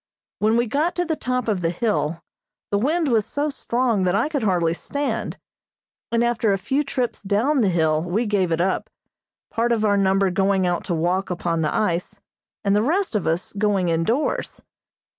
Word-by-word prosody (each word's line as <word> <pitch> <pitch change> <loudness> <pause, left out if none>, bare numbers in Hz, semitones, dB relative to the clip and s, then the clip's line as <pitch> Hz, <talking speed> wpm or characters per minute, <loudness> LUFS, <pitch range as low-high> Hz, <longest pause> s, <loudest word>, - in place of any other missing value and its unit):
When 220 +2 +3
we 240 - +2
got 295 +9 0
to 355 - 0
the 320 -1 -1
top 250 -4 -2
of 210 -4 +1
the 165 - +1
hill 170 -4 -1 0.5
the 200 - +2
wind 315 +7 +1
was 230 -5 +3
so 290 +7 -2
strong 240 -5 0
that 180 +1 +2
I 250 - +1
could 290 -4 -1
hardly 175 -6 +2
stand, 260 +4 -3 0.7
and 235 0 +2
after 235 -3 +1
a 195 - +2
few 270 +9 0
trips 255 -4 -2
down 220 +8 +1
the 205 - +3
Hill 160 -3 +2
we 180 +8 -1
gave 195 -5 +1
it 165 - +1
up, 185 +2 0 0.6
part 235 +1 0
of 220 -2 +2
our 205 -1 +3
number 195 -1 +2
going 195 0 +2
out 175 -1 0
to 175 - -1
walk 180 +4 0
upon 170 -2 -1
the 155 - 0
ice, 190 0 -1 0.4
and 200 0 +2
the 210 - +3
rest 350 - 0
of 205 - 0
us 165 +3 -1
going 200 -3 +1
indoors. 165 - -1
205 Hz, 195 wpm, -22 LUFS, 180-240 Hz, 0.7 s, When